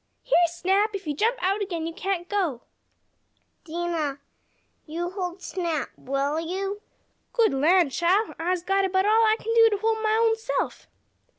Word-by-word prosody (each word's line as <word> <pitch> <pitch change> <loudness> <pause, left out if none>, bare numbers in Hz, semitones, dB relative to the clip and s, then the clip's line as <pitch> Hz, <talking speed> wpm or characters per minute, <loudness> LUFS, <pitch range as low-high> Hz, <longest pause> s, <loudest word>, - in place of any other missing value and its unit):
"Here, 350 -8 +4
Snap! 385 +5 +1
If 390 - -6
you 300 - -1
jump 450 - +1
out 390 +3 +1
again 345 -5 -3
you 330 - -4
can't 365 -1 -3
go!" 350 - -1 1.0
"Dinah, 330 -4 -2 0.7
you 345 +3 -3
hold 365 -1 -5
Snap, 335 -7 -2
will 275 +3 -1
you?" 390 +5 -3 0.5
"Good 460 - +3
lan' 320 +3 +3
chile! 370 +9 +1
I'se 350 +1 -1
got 390 +1 +1
about 380 0 +1
all 440 +2 +4
I 435 -1 +4
kin 455 - -2
do 455 -1 +7
to 415 - 0
hold 440 +1 0
mah 435 0 +2
own 450 0 +3
self!" 445 - -3
370 Hz, 165 wpm, -25 LUFS, 335-420 Hz, 1.0 s, do